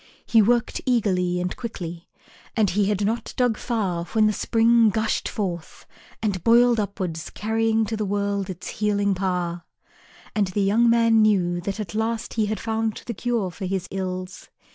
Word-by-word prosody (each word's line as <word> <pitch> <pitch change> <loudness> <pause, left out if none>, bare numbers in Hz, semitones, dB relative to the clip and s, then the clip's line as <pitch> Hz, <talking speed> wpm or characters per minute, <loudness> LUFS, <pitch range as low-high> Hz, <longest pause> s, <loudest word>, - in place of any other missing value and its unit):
He 225 - +5
worked 235 +2 +1
eagerly 185 -7 +1
and 180 0 -2
quickly, 175 -8 -7 0.5
and 210 -4 +3
he 205 +2 +2
had 205 0 0
not 225 +3 -2
dug 245 -3 +2
far 195 -8 -2
when 215 +4 +2
the 215 - +3
spring 230 +1 +3
gushed 220 +2 -1
forth 175 -6 -5 0.4
and 195 -5 -1
boiled 235 0 +5
upwards 185 -5 -3
carrying 225 +1 0
to 220 +1 -3
the 215 - -2
world 200 -1 -1
its 180 -2 -7
healing 205 -1 0
power. 180 -2 -2 0.7
And 205 -2 +2
the 195 +2 -1
young 225 +4 +4
man 230 -1 +4
knew 180 -5 +2
that 195 +4 -4
at 210 -4 -5
last 220 +1 -2
he 220 -2 +1
had 215 -1 -2
found 225 -1 -2
the 235 - -4
cure 230 -4 -1
for 185 +3 -6
his 190 -1 -2
ills. 185 -1 -5
210 Hz, 170 wpm, -24 LUFS, 185-225 Hz, 0.7 s, He